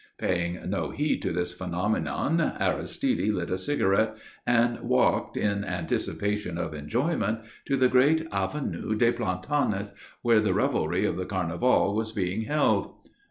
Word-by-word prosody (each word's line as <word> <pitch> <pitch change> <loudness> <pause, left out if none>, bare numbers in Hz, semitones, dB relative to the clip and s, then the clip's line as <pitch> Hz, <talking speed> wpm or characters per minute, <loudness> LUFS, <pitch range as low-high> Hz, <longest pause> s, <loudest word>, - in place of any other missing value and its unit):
Paying 85 0 -1
no 100 +2 -1
heed 150 +1 -1
to - - -1
this 90 +1 -1
phenomenon, 90 - -1 0.2
Aristide 260 - 0
lit 90 -4 -3
a 90 - +1
cigarette 110 -2 +1 0.3
and 120 0 +3
walked, - - +1
in 100 -1 0
anticipation 100 +1 -2
of 90 - -3
enjoyment, 115 - -1 0.3
to 135 - +1
the 130 -1 +5
great 145 +6 +4
Avenue 105 +3 -2
des 115 +2 +4
Plantanes 100 0 -1 0.3
where 115 -2 +5
the 105 -4 +1
revelry - - +1
of - - -1
the 90 - -2
Carnival 95 +4 +1
was 110 0 -1
being 100 +2 -1
held. 135 -8 +1
105 Hz, 140 wpm, -27 LUFS, 90-120 Hz, 0.3 s, the